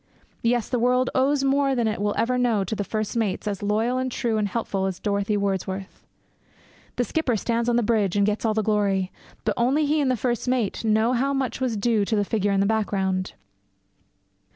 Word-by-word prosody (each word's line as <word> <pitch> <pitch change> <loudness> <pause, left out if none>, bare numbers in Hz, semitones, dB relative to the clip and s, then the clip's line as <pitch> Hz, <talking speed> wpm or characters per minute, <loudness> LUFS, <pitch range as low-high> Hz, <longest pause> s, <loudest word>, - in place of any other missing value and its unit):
Yes, 235 -1 +1
the 250 - -1
world 250 +2 +2
owes 275 +2 +2
more 275 0 +2
than 235 -3 +1
it 215 -1 -2
will 205 0 0
ever 250 +2 +1
know 230 -5 +2
to 205 +2 -3
first 215 +2 -3
mates 215 -3 -1
as 200 -2 -3
loyal 220 +5 0
and 255 0 -2
true 230 -3 -1
and 210 - +1
helpful 195 -2 -2
as 190 -2 -3
Dorothy 205 0 0
Wordsworth. 195 -1 -3 0.9
The 245 - +1
skipper 245 -1 0
stands 235 +3 0
on 240 - +2
the 240 - +2
bridge 210 -4 +1
and 200 0 +3
gets 210 +1 -1
all 220 -2 +1
the 220 - +1
glory, 200 -3 +1 0.3
but - - +1
only 270 +6 +2
he 300 +1 +2
and 275 - +1
the 255 - +1
first 240 0 -1
mate 250 -5 0
know 220 +2 +2
how 270 +3 +1
much 265 -3 -2
was 245 -4 0
due 215 0 +2
to 220 - 0
the 205 -1 +1
figure 205 -1 0
in 195 0 +2
the - - +2
background. 195 -3 0
220 Hz, 210 wpm, -24 LUFS, 205-245 Hz, 0.9 s, and